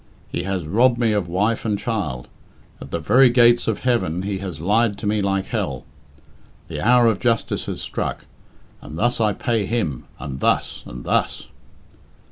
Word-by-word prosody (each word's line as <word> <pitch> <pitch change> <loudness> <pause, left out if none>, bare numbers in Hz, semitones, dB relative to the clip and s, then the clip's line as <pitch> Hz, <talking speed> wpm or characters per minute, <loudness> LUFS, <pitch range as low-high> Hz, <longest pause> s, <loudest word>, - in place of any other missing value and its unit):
He 85 - -3
has 95 -4 -2
robbed 120 +9 +3
me 115 -2 +2
of 100 -4 0
wife 105 +6 0
and 105 -2 0
child; 85 - -3 0.5
at 70 - -9
the 85 - -2
very 125 +11 +5
gates 120 -1 +4
of 110 -2 -1
heaven 115 -9 0
he 100 -1 -3
has 90 -6 -6
lied 105 +4 +2
to - - -7
me 105 0 +1
like 95 -1 0
hell. - - -3 0.8
The - - -4
hour 120 +1 +5
of 110 -4 +2
justice 115 -3 0
has - - -4
struck, - - -4 0.6
and 75 - -9
thus 120 +3 +1
I 105 -2 +2
pay 115 -2 -1
him 90 - -2
and 65 -2 -6
thus - - 0
and - - -8
thus." - - -1
105 Hz, 175 wpm, -22 LUFS, 90-115 Hz, 0.8 s, very